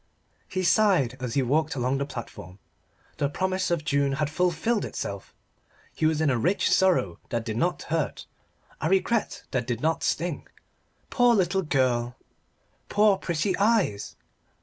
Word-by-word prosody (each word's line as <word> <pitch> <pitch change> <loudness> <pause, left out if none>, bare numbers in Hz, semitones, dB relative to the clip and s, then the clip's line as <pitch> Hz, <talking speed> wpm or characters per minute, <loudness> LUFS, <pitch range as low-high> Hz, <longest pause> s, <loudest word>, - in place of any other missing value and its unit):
He 185 - -2
sighed 180 - +3
as 125 -3 -4
he 135 - +2
walked 150 +5 +1
along 130 +1 0
the 140 - -2
platform. 95 -8 -9 0.6
The 140 - 0
promise 185 +4 -1
of 170 -3 -1
June 140 -2 +1
had 150 +1 -1
fulfilled 180 +6 0
itself: 100 -1 -6 0.6
he 155 - +1
was 155 -1 0
rich 155 - +1
in - - +2
a - - +5
sorrow 170 - +2
that 115 -1 -2
did 110 -2 -3
not 175 +10 0
hurt 160 -3 -2 0.6
a 155 - 0
regret 195 +4 0
that 125 -3 -1
did 120 -3 -2
not 160 +4 0
sting. 170 -3 -2 0.6
Poor 245 -1 +4
little 190 -1 +1
girl! 125 -6 0 0.7
Poor 205 -2 +4
pretty 170 +3 -1
eyes! 200 - +1
155 Hz, 150 wpm, -26 LUFS, 130-185 Hz, 0.7 s, a